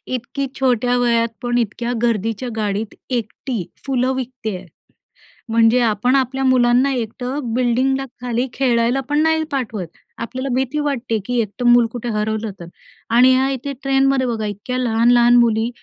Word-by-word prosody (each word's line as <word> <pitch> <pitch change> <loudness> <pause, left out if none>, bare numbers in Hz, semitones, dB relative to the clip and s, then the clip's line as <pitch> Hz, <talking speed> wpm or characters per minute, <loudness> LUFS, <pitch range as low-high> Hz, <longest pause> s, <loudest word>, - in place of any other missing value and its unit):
इतकी 270 +3 -4
छोट्या 245 -1 +2
वयात 235 -1 +2
पण 240 0 0
इतक्या 235 +2 -2
गर्दीच्या 225 +2 -1
गाडीत 210 0 -2 0.2
एकटी 235 -2 -3 0.2
फुलं 260 -1 +1
विकती 245 -5 -4
आहे. 180 - -12 0.8
म्हणजे 230 +2 +4
आपण 235 +3 +2
आपल्या 265 0 0
मुलांना 255 +1 +4
एकटं 245 +1 -4
बिल्डिंगला 255 +2 +1 0.2
खाली 245 +1 -1
खेळायला 245 0 +1
पण 295 +1 +2
नाही 320 0 +2
पाठवत. 220 -9 -3 0.3
आपल्याला 260 +4 -4
भीती 265 +3 -1
वाटते, 255 -6 -1
की 245 +1 -1
एकटं 225 +3 -5
मूल 240 0 +6
कुठे 240 0 -5
हरवलं 215 0 -2
तर? 170 - -8 0.4
आणि 250 +3 +6
ह्या 265 +1 +2
इथे 275 +2 -4
ट्रेनमध्ये 270 -1 +2
बघा 220 -2 -2
इतक्या 205 +5 -4
लहान-लहान 240 0 +4
मुली, 230 -1 +3
245 Hz, 150 wpm, -19 LUFS, 225-260 Hz, 0.8 s, मूल